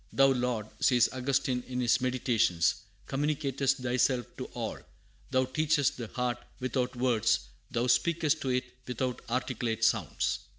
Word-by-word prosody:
"Thou 135 0 +5
Lord," 125 -4 0
says 125 -2 +4
Augustine 130 -1 0
in 125 0 -3
his 125 +1 +3
Meditations, 115 -9 +2 0.3
"communicatest 135 -2 0
thyself 125 0 +2
to - - -4
all: - - -3 0.5
thou 130 -1 +2
teachest 145 +1 +1
the 120 -3 -5
heart 125 +1 -2 0.2
without 125 0 -1
words; 115 - +2 0.3
thou 120 +1 0
speakest 155 +5 +2
to 135 - -2
it 125 0 +1 0.2
without 125 0 -2
articulate 120 -2 -1
sounds." - - +1
125 Hz, 135 wpm, -30 LUFS, 120-135 Hz, 0.5 s, Thou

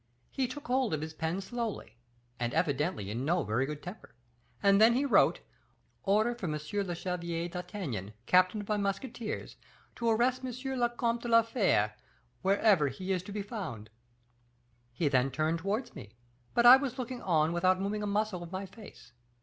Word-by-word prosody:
He 265 -2 0
took 285 +4 -8
hold 255 -8 +1
of 150 - -5
his 160 0 -5
pen 165 +4 -2
slowly, 225 - -5 0.4
and 120 -1 -2
evidently 130 - 0
in 120 +4 -3
no 170 +4 +1
very 120 +5 0
good 150 0 -6
temper; 180 - -10 0.5
and 200 +1 +5
then 230 +2 +7
he 275 +3 +1
wrote, 275 - +4 0.6
'Order 215 +4 +2
for 235 -6 -5
M. 155 - -1
le 175 +5 -3
Chevalier 170 -1 -3
d'Artagnan, 175 - -5
captain 185 +5 +4
of 205 - -10
my 210 - 0
musketeers, 210 +4 -4 0.4
to 235 -1 0
arrest 250 +3 +2
M. 255 - -3 0.3
le 240 0 +3
Comte 235 0 -1
de 240 - -5
la 230 -1 +6
Fere, 190 - +1 0.5
wherever 195 -4 +4
he 185 +9 -4
is 185 -2 +1
to 185 - -10
be 205 0 -3
found.' 155 - -6 1.0
He 145 +6 -1
then 135 -1 +2
turned 155 +5 0
towards 205 +8 -2
me; 105 +1 -11 0.4
but 240 - +4
I 250 +2 +11
was 265 -1 -4
looking 255 -1 -5
on 160 -2 +2
without 185 +2 +2
moving 205 +2 -2
a 210 - -2
muscle 205 -2 -1
of 170 0 -9
my 190 +1 -4
face. 195 - -14
195 Hz, 180 wpm, -31 LUFS, 160-230 Hz, 1.0 s, I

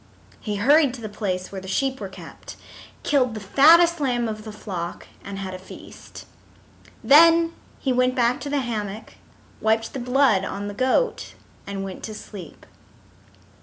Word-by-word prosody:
He 210 -2 -4
hurried 275 +5 +4
to 240 - -11
the 215 - -6
place 185 -4 -3
where 195 -1 -6
the 190 - -10
sheep 265 +6 -1
were 195 - -5
kept, 190 - -11 0.5
killed 255 -5 +1
the - - -4
fattest 330 - +5
lamb 245 -4 0
of 215 0 -6
the 215 - -7
flock, 180 -5 -6 0.2
and 200 -1 -7
had 190 -1 -5
a 185 - -7
feast. 185 - -12 0.8
Then 330 +3 +6 0.2
he 265 - -1
went 255 0 +2
back 245 -1 +2
to 285 - -5
the 285 -1 0
hammock, 215 -3 -5 0.5
wiped 220 +1 +1
the 270 - -4
blood 250 -5 +2
on 200 +1 -4
the 205 - -5
goat, 260 - 0 0.3
and 195 -1 -4
went 190 -1 -7
to 215 - -7
sleep. 195 -5 -11
225 Hz, 165 wpm, -23 LUFS, 200-270 Hz, 0.8 s, Then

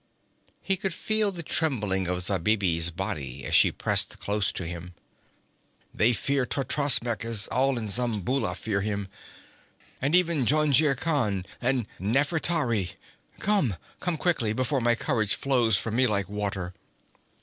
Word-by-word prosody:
He 195 -1 +1
could 190 -2 -3
feel 215 -2 +1
the 175 -3 -5
trembling 105 - +1
of 90 0 -1
Zabibi's 95 -3 +2
body 70 -5 -4
as - - -5
she - - +5
pressed - - +1
close 100 -1 -1
to 90 - -5
him. 85 +1 -8 1.0
'They 115 +3 +2
fear 140 +4 0
Totrasmek, 130 -4 +2
as 115 -3 +1
all 130 +1 +1
in 110 -2 -4
Zamboula 115 -2 -1
fear 100 +1 -2
him, 100 -1 -3 0.9
even 160 -2 +2
Jungir 150 -1 +3
Khan 120 - 0 0.2
and 125 -1 0
Nafertari. 125 - 0 0.5
Come! 195 - +1 0.2
Come 175 -3 -2
quickly, 145 -11 0
before 130 +3 -1
my 120 0 +2
courage 110 -3 0
flows 120 -6 +1
from 115 +3 -3
me 130 0 +4
like 100 -4 -1
water!' 100 -3 -4
115 Hz, 135 wpm, -26 LUFS, 100-140 Hz, 1.0 s, she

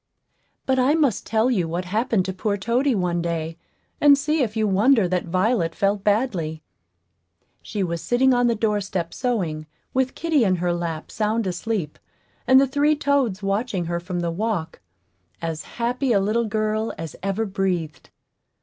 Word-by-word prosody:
But 260 0 +2
I 265 +4 +3
must 285 -10 +1
tell 225 +3 +2
you 185 -8 +1
what 175 +3 -3
happened 210 0 0
to 190 - -3
poor 200 +2 -1
Toady 240 +6 +1
one 175 -3 0
day, 165 -1 -3 0.4
and 285 -1 +7
see 300 +2 0
if 225 -3 -1
you 215 -1 +2
wonder 210 +2 +4
that 180 0 -1
Violet 185 0 +1
felt 200 0 0
badly. 200 -8 0 1.0
She 205 -3 -3
was 170 -2 -3
sitting 260 +2 +3
on 245 0 +3
the 235 - +2
doorstep 205 -5 -1
sewing, 175 - -2 0.3
with 260 0 0
kitty 315 -5 +2
in 190 -3 +3
her 175 0 0
lap, 170 -2 -4
sound 220 +1 0
asleep, 180 -3 -3 0.5
and 260 0 +7
the 275 - +5
three 290 +3 +2
toads 275 -9 0
watching 195 -2 -1
her 170 +1 -2
from 175 0 -4
the 170 -1 -1
walk 190 -2 -3 0.6
as 165 -2 -4
happy 245 +2 0
a 200 - +4
little 215 +4 +1
girl 215 +1 -1
as 160 -1 -6
ever 195 +3 -1
breathed. 185 -5 -2
205 Hz, 170 wpm, -23 LUFS, 175-245 Hz, 1.0 s, and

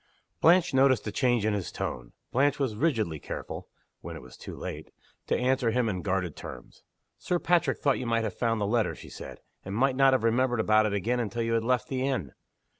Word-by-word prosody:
Blanche 170 -1 +5
noticed 130 -1 +4
a 105 - -2
change 120 -2 +1
in 110 - +2
his 100 -5 -3
tone. - - -5 0.2
Blanche 140 +3 +2
was 135 -6 0
rigidly 110 - 0
careful - - -6 0.3
(when - - -8
it - - -8
was 65 - -13
too - - -9
late) - - -7 0.4
to - - +1
answer 125 -1 +1
him 120 +1 +1
in 95 -4 -2
guarded 90 -5 -1
terms. - - -10 0.4
"Sir 180 - 0
Patrick 175 0 +2
thought 140 -2 +1
you 125 - -4
might 115 -1 +1
have 110 -4 -2
found 115 +1 0
the 105 - 0
letter," 110 +1 +1
she - - -12
said, - - -9 0.2
"and 95 +1 -5
might 130 +3 +2
not 135 0 +5
have 130 - +2
remembered 120 +1 +2
about 110 0 +4
it 105 - -2
again 115 +5 0
until 120 0 -2
after - - 0
you 115 - 0
had 115 -1 +1
left 125 +3 +1
the 130 -4 -2
inn." 130 - -1
120 Hz, 225 wpm, -28 LUFS, 105-130 Hz, 0.4 s, Blanche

